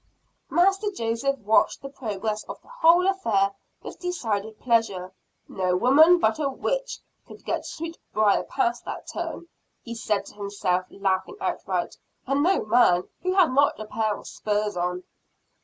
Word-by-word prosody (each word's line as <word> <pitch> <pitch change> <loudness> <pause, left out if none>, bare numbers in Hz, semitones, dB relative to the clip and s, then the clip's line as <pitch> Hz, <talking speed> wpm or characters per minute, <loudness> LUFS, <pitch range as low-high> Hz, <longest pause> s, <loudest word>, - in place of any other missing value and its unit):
Master 390 +4 +3
Joseph 255 - -1
watched 215 +5 +2
the 275 - -6
progress 215 -4 -4
of - - -8
the - - -22
whole 355 -7 +4
affair 225 - +2 0.3
with - - -9
decided 220 - -3
pleasure. 225 -7 0 0.4
"No 185 -1 0
woman 310 - +6
but 220 -6 +1
a 285 -3 +1
witch - - -2 0.3
could - - -14
get - - -2
Sweetbriar 310 -11 -1
past 240 +1 -1
that - - -6
turn," 340 - -5 0.4
he 235 - -6
said 215 -3 -1
to - - -12
himself, 200 -3 -2
laughing 195 - -2
outright, - - -2 0.3
"And 275 +2 +1
no 370 - +2
man, 210 -6 +3
who 370 +1 -1
had 355 -9 +4
not 280 -2 +3
a 215 - -5
pair 215 -1 -1
of - - -13
spurs 210 -1 -2
on." 180 +1 -2
230 Hz, 155 wpm, -25 LUFS, 205-325 Hz, 0.4 s, woman